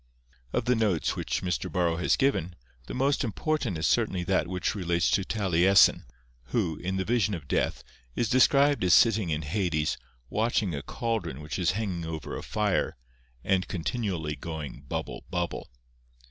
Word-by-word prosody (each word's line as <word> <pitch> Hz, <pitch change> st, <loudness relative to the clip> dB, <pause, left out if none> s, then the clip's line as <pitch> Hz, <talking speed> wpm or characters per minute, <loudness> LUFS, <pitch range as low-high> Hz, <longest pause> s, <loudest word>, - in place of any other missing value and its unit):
Of -, -, -1 dB
the 125 Hz, -, +3 dB
notes 105 Hz, -8 st, +1 dB
which -, -, -2 dB
Mr. 90 Hz, -8 st, -2 dB
Borrow 85 Hz, -2 st, +1 dB
has 90 Hz, -, +2 dB
given, 95 Hz, -, 0 dB, 0.3 s
the -, -, -5 dB
most 135 Hz, +3 st, +1 dB
important 125 Hz, -, -1 dB
is 80 Hz, -, -1 dB
certainly 105 Hz, -6 st, +1 dB
that 95 Hz, 0 st, +1 dB
which 90 Hz, -1 st, -1 dB
relates 85 Hz, -4 st, 0 dB
to 100 Hz, -, +2 dB
Taliesin, 95 Hz, -2 st, +4 dB, 0.4 s
who, 85 Hz, -, -1 dB
in 95 Hz, +2 st, -3 dB
the 95 Hz, -, -1 dB
Vision 110 Hz, -2 st, +1 dB
of 75 Hz, -5 st, -9 dB
Death, -, -, 0 dB, 0.3 s
is 120 Hz, -, +1 dB
described 140 Hz, -, +4 dB
as 90 Hz, -3 st, +6 dB
sitting 110 Hz, -6 st, +4 dB
in 80 Hz, 0 st, -1 dB
Hades, 80 Hz, -2 st, -1 dB, 0.3 s
watching 110 Hz, -, 0 dB
a 70 Hz, -, -3 dB
caldron 110 Hz, -, -3 dB
which 75 Hz, +4 st, -5 dB
is 90 Hz, 0 st, +2 dB
hanging 95 Hz, -5 st, -3 dB
over 80 Hz, -1 st, -5 dB
a -, -, -5 dB
fire, 105 Hz, -3 st, -1 dB, 0.5 s
and 95 Hz, -1 st, +2 dB
is -, -, -15 dB
continually 85 Hz, -4 st, -2 dB
going 75 Hz, -2 st, -6 dB
bubble, -, -, -4 dB
bubble. 90 Hz, -1 st, -3 dB
95 Hz, 165 wpm, -28 LUFS, 85-110 Hz, 0.5 s, as